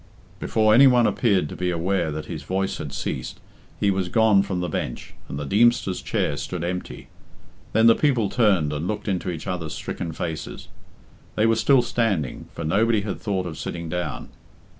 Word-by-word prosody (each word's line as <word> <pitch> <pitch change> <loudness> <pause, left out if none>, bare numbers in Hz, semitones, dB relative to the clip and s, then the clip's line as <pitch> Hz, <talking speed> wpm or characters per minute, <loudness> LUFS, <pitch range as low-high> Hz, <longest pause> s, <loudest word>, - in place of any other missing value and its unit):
Before 110 -1 +2
any 135 +5 +8
one 125 -2 +5
appeared 100 -6 +2
to - - -7
be 90 0 -1
aware 90 -1 0
that 75 0 -5
his - - -6
voice 95 +1 -2
had 70 - -5
ceased - - -4 0.4
he 100 - +2
was 95 -2 -1
gone 110 -1 +4
from 95 -2 -3
the 90 - -2
bench, - - -4 0.2
and 70 - -5
the 75 - -4
Deemster's 110 - +2
chair 70 - -1
stood 90 +2 -4
empty. 90 +1 -5 0.7
Then 110 +1 +4
the 115 - +8
people 125 -6 +1
turned 95 -11 +2
and 75 +4 -3
looked 105 +1 -4
into 95 -2 -1
each 80 -3 -5
other's 85 -4 -4
stricken 85 -2 -5
faces. 80 -1 -6 0.7
They 110 - +2
were 115 0 +4
still 125 +3 +4
standing, 100 - -1
for 85 - -6
nobody 105 +7 +2
had 100 -1 -5
thought 95 -3 -1
of 80 -3 -6
sitting 85 -1 -5
down. 90 +1 -4
95 Hz, 185 wpm, -23 LUFS, 85-110 Hz, 0.7 s, any